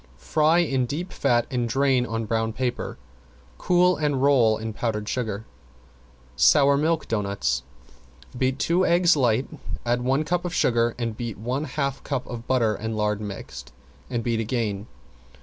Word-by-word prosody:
Fry 155 - +2
in 135 -7 +1
deep 165 +8 -4
fat 120 -1 +2
and 120 -2 -1
drain 135 -1 +2
on 115 0 -3
brown 110 0 -1
paper. 125 +1 -3 0.6
Cool 180 -1 +3
and 145 -3 0
roll 130 -6 +4
in 110 0 -5
powdered 105 -2 -2
sugar. 110 -4 -3 0.9
~SOUR 140 - +5
MILK 160 +3 0
DOUGHNUTS~ 100 - -1 0.7
Beat 130 +1 0
two 170 +6 +2
eggs 175 -1 +4
light, 125 -2 +2 0.4
add 120 +1 +1
one 135 +4 +1
cup 175 +2 -1
of 175 -1 -4
sugar 120 -1 +2
and 115 -2 -3
beat, 115 -2 -5
one 125 +8 -2
half 140 -1 -3
cup 135 -3 -3
of 120 -1 -8
butter 120 -4 +2
and 110 +1 -4
lard 105 0 0
mixed, 70 -11 -8 0.4
and 120 -2 -2
beat 115 -1 0
again. 110 -3 -2
120 Hz, 155 wpm, -24 LUFS, 110-140 Hz, 0.9 s, ~SOUR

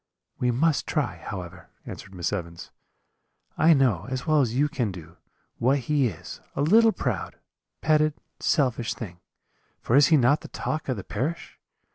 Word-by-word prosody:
"'We 125 - +1
must 145 +5 +1
try, - - -1
however,' 90 -1 -8 0.2
answered 95 - -9
Miss 90 +2 -2
Evans; 85 -4 -6 0.8
'I 160 +1 +5
know, 120 - +2
as 130 -1 -3
well 155 -2 +4
as 120 -3 -1
you 145 +3 +3
can 120 -7 -2
do, 85 -1 -11 0.4
what 130 +4 +3
he 140 0 +1
is, 90 -5 -8
a 140 - 0
little 225 +8 +6
proud, - - -3 0.5
petted, 155 -1 +3 0.2
selfish 120 -6 +1
thing: 95 -6 -8 0.6
for 120 - 0
is 145 +1 +7
he 160 - +5
not 140 +3 +3
the - - -9
talk 155 -2 -4
of 130 - 0
the 95 - -6
parish? 155 - -4
125 Hz, 165 wpm, -26 LUFS, 100-150 Hz, 0.8 s, is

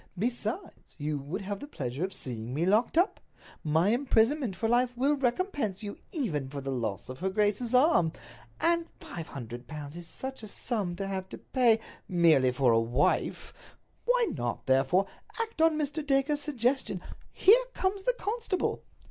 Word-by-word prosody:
Besides, 240 - -3
you 150 -1 -2
would 150 +9 -5
have 200 0 -4
the 290 - -8
pleasure 135 - -4
of 190 - -1
seeing 120 -5 -5
me 165 +4 +1
locked 215 - +2
up. 365 +5 +3 0.4
My 160 +5 +3
imprisonment 245 -1 +2
for 225 - -1
life 245 +1 +2
would 280 +2 +2
recompense 245 - 0
you 205 -1 -6
even 160 - -2
for 140 +1 -5
the 135 0 -4
loss 110 -6 -3
of 130 0 -8
her 190 - 0
grace's 210 +5 +1
arm. 250 - +5 0.5
And 335 0 +2
five 165 -2 -7
hundred 120 -2 -8
pounds 150 +1 -7
is 175 -1 -7
such 265 +10 -6
a 215 - -7
sum 200 -4 -2
to 195 +2 -3
have 190 -1 -4
to - - -7
pay—merely 175 - +2
for 125 -1 +3
a 115 - +5
wife! 120 +5 0 0.5
Why - - +3
not, 120 -4 -3
therefore, 135 +8 +3 0.3
act 455 -7 -2
on 325 -1 +5
Mr. 300 +1 -1
Dacre's 285 +1 +2
suggestion? 260 -7 0 0.3
Here 475 +6 +6
comes 385 +1 0
the - - +2
constable." 425 -3 -1
210 Hz, 165 wpm, -29 LUFS, -, 0.5 s, Here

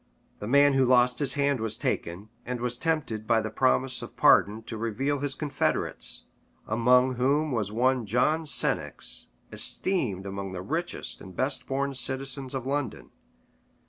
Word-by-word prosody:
The 105 - -6
man 140 +3 +5
who 135 0 +3
lost 125 -1 +3
his 140 -3 0
hand 140 -2 +1
was 110 -1 -2
taken; 90 +6 -3
and 125 0 -4
was 125 0 -2
tempted 125 -8 -2
by 115 -1 +4
the - - -4
promise 65 0 +1
of - - -10
pardon 110 +2 +4
to 115 0 -7
reveal 120 +6 -1
his 140 0 -2
confederates; 145 -3 -1 0.4
among 125 +3 +3
whom 145 +4 +1
was 105 -5 -1
one 125 +1 +1
John 125 +9 +2
Senex, 145 -5 0 0.2
esteemed 120 - 0
among 100 -1 -5
the 90 -1 -5
richest 165 - -3
and 95 -1 -11
best 135 +5 0
born 140 +1 -1
citizens 135 0 -2
in 130 - -3
London. 135 -2 -3
125 Hz, 155 wpm, -27 LUFS, 110-140 Hz, 0.4 s, man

